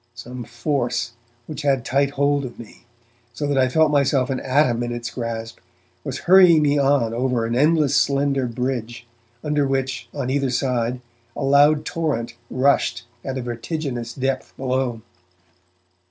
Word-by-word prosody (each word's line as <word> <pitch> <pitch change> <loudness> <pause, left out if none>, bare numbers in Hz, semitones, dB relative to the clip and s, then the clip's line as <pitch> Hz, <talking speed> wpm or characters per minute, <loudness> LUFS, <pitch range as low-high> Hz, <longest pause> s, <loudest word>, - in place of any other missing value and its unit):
Some 120 0 -8
force, 120 -1 -2 0.3
which 150 +2 -6
had 135 -4 +1
tight 140 +2 +2
hold 140 0 +1
of 120 -3 -7
me, 120 0 -13 0.5
so 145 - -3
that 145 -1 0
I 130 0 +3
felt 160 +2 +3
myself 140 -2 +2
an 130 - -1
atom 130 -3 +2
in 120 0 -2
its 120 0 -5
grasp, 115 -1 -5 0.4
was - - -5
hurrying 180 -4 +7
me 145 0 +2
on 135 -5 +2
over 125 -1 0
an 115 +1 -2
endless 150 0 +3
slender 140 -2 +1
bridge, 120 -1 -4 0.4
under 150 -2 +1
which 135 -1 -2
on 130 -3 -3
either 140 -1 0
side 125 -1 -1 0.3
a - - -4
loud 145 +2 +4
torrent 135 -8 -2 0.2
rushed 130 -3 +1 0.2
at 135 0 -4
a 130 - -3
vertiginous 120 0 -4
depth 135 0 -3
below. 130 -3 -2
130 Hz, 155 wpm, -22 LUFS, 120-145 Hz, 0.5 s, hurrying